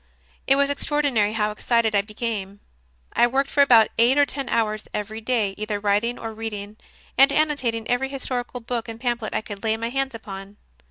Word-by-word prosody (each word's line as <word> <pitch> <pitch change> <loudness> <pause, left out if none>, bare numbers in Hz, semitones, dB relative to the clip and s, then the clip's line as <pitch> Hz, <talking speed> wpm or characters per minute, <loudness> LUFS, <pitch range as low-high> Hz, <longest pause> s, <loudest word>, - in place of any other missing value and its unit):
It 270 - +5
was 280 0 +2
extraordinary 280 -8 +1
how 210 -1 0
excited 225 +1 +1
I 200 - +4
became. 205 -2 -5 0.5
I 240 - +5
worked 270 +3 0
for 285 - +4
about 235 -6 +6
eight 245 +4 +5
or 290 - +6
ten 275 -2 -5
hours 215 -2 0
every 215 +2 -4
day, 220 -4 0
either 210 -1 -2
writing, 210 +4 +1
or 225 -1 -6
reading 215 -1 -5 0.4
and 275 +1 +7
annotating 280 -7 0
every 245 +2 0
historical 250 -2 -4
book 230 0 -4
and 225 0 -8
pamphlet 240 -3 -2
I - - +1
could 205 -1 -9
lay 220 0 +1
my 230 +1 -3
hands 270 0 -1
upon. 200 -2 -9
230 Hz, 185 wpm, -23 LUFS, 215-260 Hz, 0.5 s, and